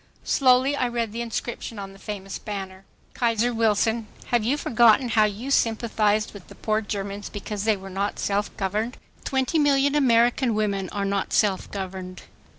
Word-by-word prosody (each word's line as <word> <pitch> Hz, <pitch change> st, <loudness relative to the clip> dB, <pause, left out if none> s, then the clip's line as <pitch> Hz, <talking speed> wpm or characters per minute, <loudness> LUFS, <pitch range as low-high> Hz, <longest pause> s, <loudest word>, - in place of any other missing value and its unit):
Slowly 260 Hz, +1 st, +4 dB
I 255 Hz, -, +1 dB
read 235 Hz, -2 st, -2 dB
the 230 Hz, +2 st, -4 dB
inscription 235 Hz, 0 st, -4 dB
on 195 Hz, -1 st, -7 dB
the 195 Hz, -, -16 dB
famous 195 Hz, -1 st, -6 dB
banner, 195 Hz, -2 st, -6 dB, 0.3 s
"Kaiser 235 Hz, 0 st, +1 dB
Wilson, 225 Hz, 0 st, +1 dB, 0.2 s
have 240 Hz, -2 st, +2 dB
you 260 Hz, +7 st, +1 dB
forgotten 235 Hz, -1 st, +4 dB
how 215 Hz, -1 st, +4 dB
you 215 Hz, +6 st, -4 dB
sympathized 220 Hz, -3 st, +1 dB
with 200 Hz, -3 st, -12 dB
the -, -, -13 dB
poor 215 Hz, 0 st, 0 dB
Germans 200 Hz, -1 st, -5 dB
because 205 Hz, 0 st, -5 dB
they 220 Hz, -2 st, +3 dB
were 190 Hz, 0 st, -10 dB
not 195 Hz, +2 st, -2 dB
self 205 Hz, +1 st, 0 dB
governed? 210 Hz, +5 st, -2 dB, 0.3 s
Twenty 265 Hz, +4 st, 0 dB
million 285 Hz, -1 st, +3 dB
American 240 Hz, -3 st, +3 dB
women 200 Hz, -3 st, -1 dB
are 200 Hz, -1 st, -2 dB
not 200 Hz, 0 st, -1 dB
self 200 Hz, -3 st, +2 dB
governed. 185 Hz, -2 st, -6 dB
215 Hz, 165 wpm, -24 LUFS, 200-240 Hz, 0.3 s, Slowly